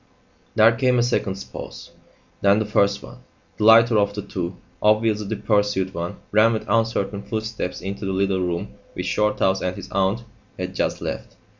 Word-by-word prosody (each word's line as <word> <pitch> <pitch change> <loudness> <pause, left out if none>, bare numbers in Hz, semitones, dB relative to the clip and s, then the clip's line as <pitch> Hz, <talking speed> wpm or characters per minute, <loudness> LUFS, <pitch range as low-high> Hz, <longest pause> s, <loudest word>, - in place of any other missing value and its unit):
There 110 +1 +7
came 125 +1 +2
a 120 - +3
second's 100 -5 -1
pause. - - -9 0.5
Then 100 +1 +5
the 110 - 0
first 100 -1 +1
one, - - -12 0.4
the 105 - 0
lighter 115 0 +7
of 100 0 0
the 105 - -4
two, 90 0 -5 0.2
obviously 105 -1 +2
the 110 - -2
pursued 105 -2 0
one, 85 +1 -4 0.2
ran 110 +2 +5
with 110 - -3
uncertain 105 -3 0
footsteps 110 -4 -4
into 100 +2 -5
the - - -1
little 95 0 +1
room 85 -1 -3 0.2
which - - -4
Shorthouse 95 -2 +1
and 90 0 -2
his - - -9
aunt 100 +4 0 0.3
had 90 0 -4
just - - -1
left. - - -5
105 Hz, 175 wpm, -23 LUFS, 95-110 Hz, 0.5 s, There